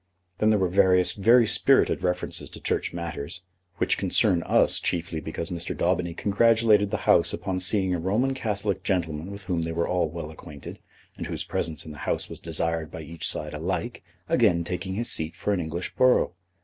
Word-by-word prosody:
Then 110 - +3
there 110 - +3
were 95 -2 +1
various 90 -1 +3
very 115 +4 +4
spirited - - +3
references 90 0 -2
to - - -11
Church - - -1
matters, 85 0 -6 0.3
which - - 0
concern 85 -2 +2
us - - +7
chiefly 85 -2 -2
because 80 +3 -6
Mr. 85 -1 -3
Daubeny 85 -2 -1
congratulated 110 0 +3
the - - -4
House - - +4
upon 95 -1 -3
seeing 95 0 +1
a 90 - -2
Roman 110 +10 0
Catholic 105 -5 -3
gentleman 85 -3 -2
with 100 0 -9
whom 90 -2 -2
they 80 0 -3
were 85 +1 -1
all 90 -3 0
well 80 -1 -7
acquainted, 75 -2 -11 0.4
and - - -4
whose - - -4
presence 80 -3 -3
in 80 - -9
the 75 - -11
House - - -2
was - - -8
desired 80 -1 -2
by 80 - -8
each 80 +1 -5
side 75 0 +1
alike, 90 +9 -4 0.2
again 90 -8 +2
take 90 +3 -5
his 95 +5 -2
seat 80 0 -2
for 105 - -2
an 95 - -1
English 85 +2 -5
borough. 130 -7 +3
90 Hz, 190 wpm, -25 LUFS, 85-100 Hz, 0.4 s, us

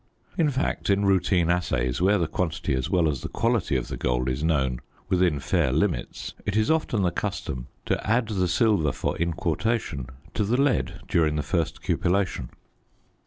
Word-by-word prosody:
In 165 -5 +3
fact, 135 -5 -1
in 100 0 +3
routine 90 -3 +3
assays, 85 -7 0
where 100 +3 +4
the 85 - +1
quantity 85 -1 -2
as 65 -1 -1
well 85 -3 +3
as 70 -4 -1
the - - -5
quality - - 0
of - - -1
the - - -5
gold 60 +1 0
is 65 +4 -2
known 65 -6 +1 0.3
within 90 -6 +2
fair - - +1
limits, - - -1
it 105 +1 -1
is 110 +6 +3
often 135 -10 +1
the 90 - +2
custom 65 -5 -4 0.2
to - - -1
add 115 0 +2
the 95 -4 +1
silver 90 - +2
for - - -2
inquartation 85 - -1 0.3
to 105 - 0
the 115 +6 +1
lead 140 -1 +1
during 80 -3 +2
the 75 - -1
first 80 +2 -2
cupellation. 90 -7 0
90 Hz, 175 wpm, -25 LUFS, 75-100 Hz, 0.3 s, where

